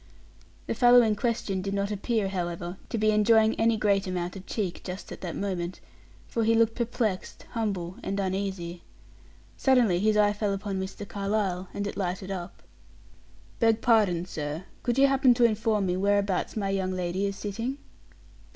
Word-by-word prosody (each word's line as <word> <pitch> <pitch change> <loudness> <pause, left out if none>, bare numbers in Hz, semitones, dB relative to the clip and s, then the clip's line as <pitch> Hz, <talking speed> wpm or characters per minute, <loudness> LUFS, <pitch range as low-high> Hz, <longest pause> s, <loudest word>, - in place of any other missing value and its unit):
The - - -2
fellow 245 -1 +6
in 215 -2 +2
question 210 -4 -1
did 195 +1 -3
not 200 +1 -1
appear, 210 0 0
however, 175 -1 -4
to - - -2
be 215 0 +3
enjoying 220 +1 +4
any 225 0 +3
great 200 -2 +2
amount 180 0 -3
of 190 -1 -10
cheek 190 -6 -3
just 185 +2 -7
at - - -8
that 175 -3 -4
moment, 180 -3 -3 0.5
for 230 - -1
he 225 +1 +3
looked 225 0 +3
perplexed, 225 -5 -2
humble 195 -5 -3
and 195 +1 -3
uneasy. 190 -3 -3 0.8
Suddenly 245 -9 +3
his 215 +2 +2
eye 205 -1 +4
fell 205 -1 -1
upon 195 -1 -3
Mr. 190 +2 -6
Carlyle, 195 -2 -1
and 200 - -3
it 200 - -5
lighted 190 0 -3
up. 180 -2 -6 1.0
"Beg 225 -1 +3
pardon, 205 -7 +3
sir; 150 -1 -5 0.2
could 240 0 -1
you 275 - +6
happen 270 -2 +4
to 240 - +2
inform 215 -2 +2
me 180 -1 0
where 200 +2 +2
abouts 200 +1 -1
my 195 -2 -1
young 190 -1 -1
lady 185 +2 -1
is 200 - -4
sitting?" 225 +7 -4
200 Hz, 175 wpm, -27 LUFS, 185-220 Hz, 1.0 s, fellow